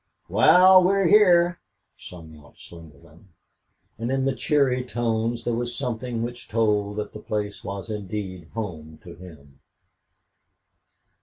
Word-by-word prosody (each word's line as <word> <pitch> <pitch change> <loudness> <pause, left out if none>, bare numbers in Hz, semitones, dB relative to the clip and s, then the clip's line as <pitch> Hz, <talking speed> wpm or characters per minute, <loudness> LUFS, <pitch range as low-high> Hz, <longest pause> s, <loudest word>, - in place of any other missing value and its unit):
"Wal, 185 +1 +6
we're 195 0 +2
hyar," 175 -4 +4 0.4
sung 80 -3 -13
out 75 -1 -19
Slingerland, 80 0 -16 0.7
and 115 +2 -3
in 135 0 0
the 135 - +1
cheery 135 -3 0
tones 115 -1 -2
there 120 - -2
was 120 +1 -3
something 120 -2 -4
which 120 +1 -7
told 105 -2 0
that 105 - -5
the 105 - -8
place 105 -1 -5
was 100 +2 -6
indeed 95 -4 -6
home 80 -8 -7
to 85 - -11
him. 70 -6 -15
110 Hz, 130 wpm, -24 LUFS, 90-125 Hz, 0.7 s, Wal